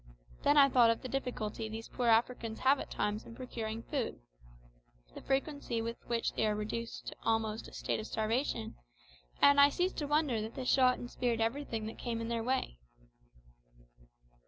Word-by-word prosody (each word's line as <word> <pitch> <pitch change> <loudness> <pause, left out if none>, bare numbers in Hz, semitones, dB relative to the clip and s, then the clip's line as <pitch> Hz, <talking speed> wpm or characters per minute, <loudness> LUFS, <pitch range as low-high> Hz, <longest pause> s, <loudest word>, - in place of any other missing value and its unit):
Then 290 - +4
I 280 -1 +9
thought 245 -3 +5
of 230 - 0
the - - -3
difficulty 240 -5 -3
these 225 +1 -6
poor 245 - -2
Africans 230 0 +2
have 270 +1 +4
at - - -6
times 210 +1 -2
in 230 - -11
procuring 230 -3 -5
food, - - -3 0.9
the - - -9
frequency 275 -3 -1
with 230 +1 -3
which 235 -1 0
they 220 - +1
are 210 - +1
reduced 230 +2 -4
almost 225 -1 0
to - - -9
a - - -20
state - - -1
of 215 - -5
starvation, 220 - -1 0.7
and 285 0 +8
I 285 - +8
ceased 360 +5 -1
to 295 - -2
wonder 295 -6 +1
that 220 +2 -6
they 255 - -4
shot 255 -1 +4
and 245 - -6
speared 240 -2 -1
everything 225 -1 -1
that 220 - -7
came 235 -2 -3
in 230 0 -4
their 230 -1 -1
way. 250 - -1
230 Hz, 180 wpm, -33 LUFS, 225-265 Hz, 0.9 s, I